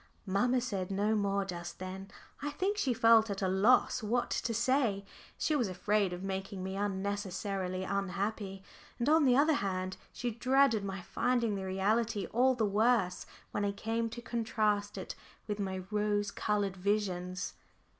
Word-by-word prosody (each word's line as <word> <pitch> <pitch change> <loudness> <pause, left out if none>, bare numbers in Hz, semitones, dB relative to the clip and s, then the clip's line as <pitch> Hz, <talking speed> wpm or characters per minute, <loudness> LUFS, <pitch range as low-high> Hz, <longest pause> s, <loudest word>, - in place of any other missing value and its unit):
Mamma 245 +6 +2
said 195 -7 -3
no 205 +2 +1
more 200 -1 +1
just 175 -2 -6
then. 190 +1 -7 0.3
I 290 - -2
think 380 +8 -1
she 285 -11 +1
felt 225 -1 +5
at 200 0 -3
a - - +2
loss 210 +7 +4
what 240 +3 0
to 235 - -1
say. 230 -3 +1 0.3
She 310 - +1
was 245 -7 +1
afraid 195 +1 +1
of 180 +1 -5
making 195 0 -4
me 190 +1 -4
unnecessarily 195 -1 -2
unhappy, 195 0 -2 0.3
and 235 - -1
on 310 0 +5
the 250 -1 +5
other 305 +3 +5
hand 185 -6 -2
she 245 -1 -3
dreaded 255 -1 +3
my 195 -2 -4
finding 235 0 0
the 190 -1 -3
reality 205 +2 +1
all 255 +3 +4
the 225 -3 +1
worse 210 -2 +2 0.2
when 205 - -1
I 200 0 0
came 225 +3 -2
to 240 +1 -8
contrast 215 -4 0
it 190 - -5 0.3
with 210 -1 -3
my 190 -2 -3
rose 210 -1 0
coloured 205 -2 -1
visions. 185 -2 -1
205 Hz, 165 wpm, -32 LUFS, 190-230 Hz, 0.3 s, felt